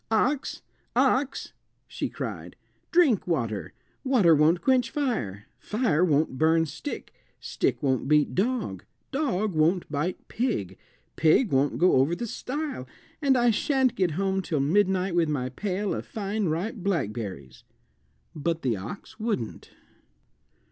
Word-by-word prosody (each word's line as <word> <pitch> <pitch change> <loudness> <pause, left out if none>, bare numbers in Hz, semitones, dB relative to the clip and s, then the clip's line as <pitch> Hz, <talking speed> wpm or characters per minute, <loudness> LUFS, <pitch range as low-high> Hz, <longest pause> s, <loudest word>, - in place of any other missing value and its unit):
"Ox, 260 +6 0 0.3
ox," 265 +2 +1 0.3
she - - -3
cried, - - -6 0.4
"drink 310 - +4
water; 115 - -1 0.3
water 235 -11 +5
won't 160 +3 +3
quench 255 -3 +3
fire, 220 - -2
fire 210 - +1
won't 150 -5 +1
burn 160 +1 +4
stick, 165 - -7 0.3
stick - - -1
won't 130 -2 +1
beat 150 0 +3
dog, 200 - -1 0.3
dog 215 -9 0
won't 165 +3 +2
bite 155 +5 -3
pig, 230 - -2 0.4
pig 165 +8 +4
won't 135 +1 +2
go 180 -5 +4
over 140 +6 +3
the 235 - -4
stile, 265 - -4 0.3
and 275 -3 +4
I 240 -1 +4
shan't 265 +2 +2
get 185 -7 +1
home 195 0 0
till 160 -5 -2
midnight 185 +4 +2
with 170 -2 +2
my 130 -4 -1
pail 195 +7 -2
of - - -5
fine 205 -1 -2
ripe 185 +10 -2
blackberries." 110 - -3 0.7
But 165 +2 -2
the 120 -5 +1
ox 110 - -9
wouldn't. 215 - -3
180 Hz, 135 wpm, -26 LUFS, 150-235 Hz, 0.7 s, water